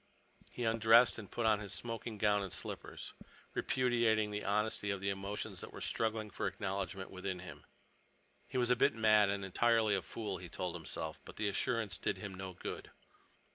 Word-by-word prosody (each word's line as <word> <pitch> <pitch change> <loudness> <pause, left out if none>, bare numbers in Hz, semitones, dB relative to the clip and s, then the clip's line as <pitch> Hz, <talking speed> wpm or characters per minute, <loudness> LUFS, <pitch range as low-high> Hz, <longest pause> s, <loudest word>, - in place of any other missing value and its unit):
He 120 - -5
undressed 115 +1 +6
and 100 - -9
put 120 - -2
on 110 -2 +4
his 105 -2 -5
smoking 115 -1 -4
gown 105 0 +3
and 95 -2 -4
slippers, - - -6 0.4
repudiating 115 -4 +2
the 105 0 -3
honesty 105 0 0
of 100 -1 0
the 100 +1 0
emotions 100 +1 -4
that - - -8
were - - -8
struggling 110 -1 -1
for - - -1
acknowledgment 95 -1 -3
within 95 0 -3
him. 90 +1 -10 0.8
He - - -3
was 125 -1 +3
a - - +6
bit 135 +2 +3
mad 110 -2 +5
and 100 -1 -1
entirely 110 +2 +3
a 95 - +2
fool, 105 -2 -4
he 90 -2 -8
told 90 +1 -3
himself. 80 -1 -5
But - - -11
the 105 - 0
assurance 110 -1 0
did - - 0
him 100 - -6
no 95 0 -6
good. - - -6
105 Hz, 185 wpm, -35 LUFS, 95-115 Hz, 0.8 s, undressed